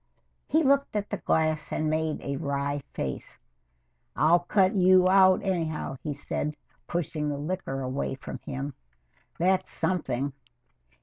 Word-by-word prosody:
He 320 +1 +3
looked 280 -3 +2
at 205 -1 -2
the 205 - -1
glass 155 -3 0
and 155 - 0
made 155 0 -1
a 140 0 -2
wry 140 -1 -2
face. 65 - -5 0.8
"I'll 160 +4 +5
cut 185 +2 +2
you 185 -1 +5
out 190 0 +6
anyhow," 160 -7 -2
he 150 - -3
said, 150 +1 -3 0.3
pushing 155 -3 -2
the 145 - -2
liquor 150 -3 -3
away 130 +1 -2
from - - -8
him. 140 +1 -5 0.6
"That's 185 +2 +2
something. 140 -6 -1
155 Hz, 135 wpm, -27 LUFS, 140-185 Hz, 0.8 s, out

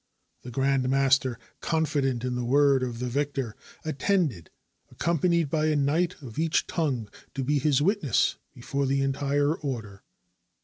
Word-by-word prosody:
The 125 - -9
grand 135 +1 +1
mas 135 0 +4
ter, 125 -3 -4 0.2
confident 145 -6 0
in 125 0 -1
the 125 0 -2
word 140 +2 +4
of 120 -2 -3
the 125 +1 -3
victor, 135 -3 -2 0.3
attended, 155 - 0 0.4
ac - - -19
companied 170 0 +2
by 155 -1 +1
a 155 - +2
knight 155 +5 +1
of 115 -1 -7
each 165 0 +2
tongue 135 - -1 0.3
to 135 - -1
be 145 +2 +1
his 145 0 +2
witness 185 - +2
50s - - -4
TURKEY - - -20
before 140 +3 -2
the 135 +1 +1
entire 140 +2 +1
order. 115 -11 -5
140 Hz, 170 wpm, -27 LUFS, 125-155 Hz, 0.4 s, mas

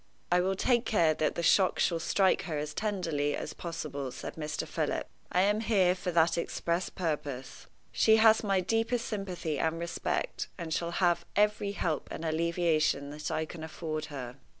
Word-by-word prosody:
"I 180 0 +5
will 190 +1 0
take 240 +4 +2
care 170 -10 +3
that 155 0 0
the 170 - -2
shock 190 +2 +4
shall 170 -2 +2
strike 190 +3 +2
her 160 -5 -3
as 150 0 -3
tenderly 165 -8 -1
as - - -5
possible," 155 -5 -5
said 125 - -7
Mr. 155 -1 -4
Philip. - - -2 0.2
"I 180 - +3
am 205 +2 +3
here 200 -5 +3
for 180 0 -4
that 165 0 +3
express 170 +1 -1
purpose. 145 -7 -4 0.2
She 220 - +5
has 220 0 +6
my 195 -3 +2
deepest 225 +4 0
sympathy 180 - -3
and 160 0 0
respect, 170 - -2
and 165 -3 -4
shall 170 +1 -1 0.2
have 175 -1 +2
every 210 -1 +2
help 160 -6 -2
and 165 - -6
alleviation 160 -3 +1
that 150 +1 -5
I 160 - -1
can 160 0 -9
afford 155 -1 -4
her." 135 -4 -7
170 Hz, 175 wpm, -30 LUFS, 155-195 Hz, 0.2 s, has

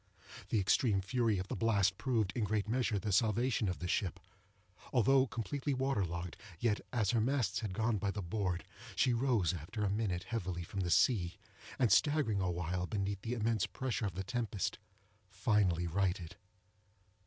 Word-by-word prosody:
The 110 - +2
extreme 100 +2 +3
fury 115 +2 +1
of 95 +1 -3
the - - -3
blast 100 -4 +2
proved, 115 -7 0
in 120 - 0
a - - +2
great 105 0 0
measure, 115 -2 +1
the 105 +1 -2
salvation 110 +2 +2
of 90 - -2
the 90 - -4
ship. 90 0 -1 0.7
Although 135 +2 +4
completely 135 +4 -2
water 130 -5 +1
logged, 85 -1 -4 0.2
yet, 110 -3 +1
as 110 -5 +1
her 115 - +2
masts 120 -5 +1
had 105 -5 -4
gone 115 +1 +1
by 100 - -1
the 100 0 -3
board, 90 -1 -2 0.3
she 125 - +3
rose, 115 - +2
after 90 +6 -4
a 100 - +1
minute, 100 -4 -1
heavily 95 -6 -3
from 95 +3 -6
the 90 -2 0
sea, 90 -3 +3 0.4
and, 125 -4 +3
staggering 145 -10 +3
awhile 90 0 -1
beneath 100 -1 -2
the 120 +3 -2
immense 115 -2 +1
pressure 125 -5 -2
of 90 - -6
the 95 - -3
tempest, 110 -2 -2 0.5
finally 95 -6 +2
righted. 90 -1 -1
105 Hz, 175 wpm, -34 LUFS, 95-120 Hz, 0.7 s, Although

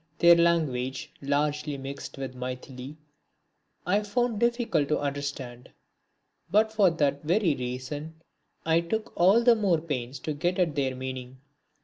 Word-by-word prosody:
Their 170 0 +7
language, 150 -7 +1
largely 145 +1 -1
mixed 135 +1 -7
with 135 -1 -5
Maithili, 125 +2 -7 0.9
I 200 +4 +2
found 225 +1 -1
difficult 235 - +1
to 150 - +1
understand; 140 -4 -4 0.8
but 220 +2 +3
for 205 -4 +5
that 145 -4 0
very 175 +1 +2
reason 130 +5 -5 0.5
I 165 +1 +3
took 220 +6 -3
all 195 +7 +5
the 240 0 +7
more 195 -7 +2
pains 140 -5 -4
to 155 - -3
get 175 +5 -1
at 175 -5 +2
their 135 -2 -1
meaning. 130 0 -6
150 Hz, 135 wpm, -27 LUFS, 135-180 Hz, 0.9 s, Their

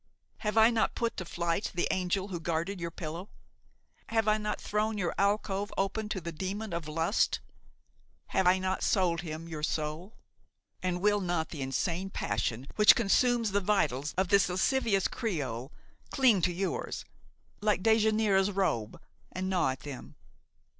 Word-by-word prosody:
Have 210 -1 -2
I 220 +2 +7
not 225 -2 +1
put 235 -1 -1
to 185 - -4
flight 170 +3 -2
the 175 - +1
angel 185 +2 -1
who 175 -3 -4
guarded 170 +3 -2
your 170 - -2
pillow? 170 +3 -6 0.8
Have 225 -1 +1
I 215 0 +3
not 210 0 -2
thrown 215 +1 -1
your 180 -4 -1
alcove 200 0 0
open 210 +2 -1
to 195 - -2
the 170 -1 -5
demon 195 +5 -4
of 170 -2 -3
lust? 165 +6 +1 0.9
Have 190 - +2
I 185 +1 +6
not 190 0 -2
sold 175 -4 +2
him 160 -1 -6
your 160 -2 -6
soul? 155 +6 -3 0.7
And 180 -1 -1
will 205 0 +3
not 175 -3 -1
the 150 - -6
insane 170 +8 -1
passion 110 - -2
which 210 0 +8
consumes 235 +1 +2
the 200 +1 +1
vitals 150 -9 0
of 190 -1 +1
this 200 -2 +4
lascivious 195 +1 +2
creole 140 - -3 0.4
cling 245 -9 +4
to 180 - +2
yours, 185 +2 -3 0.5
like 205 -3 +1
Dejanira's 215 -3 +3
robe 185 - -1 0.3
and 185 +1 -3
gnaw 180 -7 +2
at 130 -1 -4
them! 140 -1 -8
190 Hz, 160 wpm, -30 LUFS, 165-210 Hz, 0.9 s, which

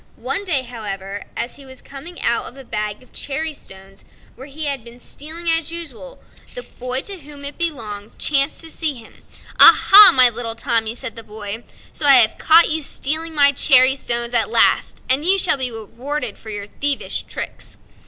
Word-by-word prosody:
One 405 - -4
day, 275 -9 -2 0.7
as 240 - -5
he 280 - -14
was 260 -1 -13
coming 320 +6 -11
out 235 - 0
of 245 - -11
a 270 - -12
bag 210 -1 -6
of 255 - -26
cherry 310 +3 -3
stones, 195 -6 -13 0.3
where 265 +3 -13
he 300 +2 -6
had 275 -4 -4
been 235 +1 -14
stealing 315 +7 -10
as 330 -1 0
usual, 285 - -9 0.4
the - - -6
boy 255 +1 -6
to 395 -2 -8
whom 290 -1 -13
it 285 +3 -9
belonged 225 -11 -4
chanced 280 +2 0
to 325 - -5
see 310 -4 -2
him. 230 -2 -17 0.4
"Ah, - - +8
ah! 410 0 +11
my 255 -1 +6
little 230 -1 -4
Tommy," 230 -1 -2
said 250 -1 -5
the 230 - -9
boy, 215 +1 -8 0.3
"so 295 - 0
I 280 - +9
have 235 -4 +5
caught 330 +1 +4
you 315 +1 0
stealing 315 +3 -1
my 285 -1 +6
cherry 265 -2 +5
stones 235 -2 -1
at 235 - +2
last, - - 0
and 265 +3 +1
you 380 +4 +3
shall 370 - +1
be 260 -2 -2
rewarded 240 +2 -7
for 220 - -12
your 205 -1 -7
thievish 280 +7 -2
tricks." - - -8
270 Hz, 195 wpm, -18 LUFS, 230-310 Hz, 0.7 s, ah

